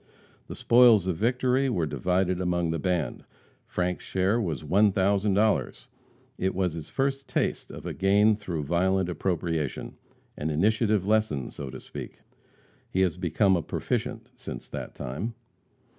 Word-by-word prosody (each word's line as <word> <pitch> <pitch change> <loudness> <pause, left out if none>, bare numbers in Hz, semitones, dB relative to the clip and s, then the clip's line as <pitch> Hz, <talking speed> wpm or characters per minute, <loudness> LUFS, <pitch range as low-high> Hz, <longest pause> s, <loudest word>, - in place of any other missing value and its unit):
The - - -7
spoils 120 -5 +6
of 90 -3 -1
victory 125 +5 +1
were 90 -9 0
divided 90 +3 0
among 85 -2 0
the 80 - -2
band. 90 -8 -1 0.4
Frank's 90 0 -2
share 95 +5 +1
was 85 -7 -3
$1,000. 100 +3 +2 0.5
It 95 0 0
was 90 -3 0
his 80 -2 -7
first 135 0 -1
taste - - -1
of - - -9 0.2
gain 100 +3 +4
through 90 -7 -4
violent 90 +4 +1
appropriation 85 -5 -2 0.4
an 75 - -3
initiative 105 +5 +2
lesson, 105 - +1
so 70 -2 -7
to 65 0 -8
speak. - - -9 0.7
He 95 - 0
has 90 -3 +2
become 90 +2 +2
a 85 - 0
proficient - - -3
since - - -8
that - - -6
time. 85 - -4
95 Hz, 140 wpm, -27 LUFS, 85-105 Hz, 0.7 s, spoils